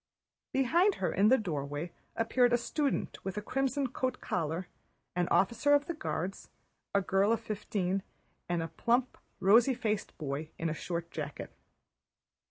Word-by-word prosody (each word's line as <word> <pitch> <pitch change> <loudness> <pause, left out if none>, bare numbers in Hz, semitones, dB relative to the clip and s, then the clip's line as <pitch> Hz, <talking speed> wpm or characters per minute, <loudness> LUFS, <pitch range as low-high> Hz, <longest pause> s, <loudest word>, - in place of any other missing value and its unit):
Behind 340 +10 +3
her - - -1
in 200 +2 +4
the 260 +4 +6
doorway 150 - -3 0.2
appeared 245 +2 +3
a - - +6
student 280 +4 -1
with 195 +1 -4
a - - -1
crimson 270 +3 0
coat 255 0 -2
collar, 170 +1 -2 0.5
an 180 -1 +1
officer 235 +9 +4
of 290 0 +2
the 340 - -3
Guards, 195 - -4 0.5
a 200 - +5
girl 195 +3 +2
of 230 - +2
fifteen, 195 -2 -2 0.5
and 175 -1 0
a - - -3
plump 245 +7 +1 0.2
rosy 230 +7 +5
faced 215 -4 -2
boy 150 +1 -3
in 165 - -1
a - - -1
short 170 +1 -4
jacket. - - -5
210 Hz, 155 wpm, -31 LUFS, 175-255 Hz, 0.5 s, the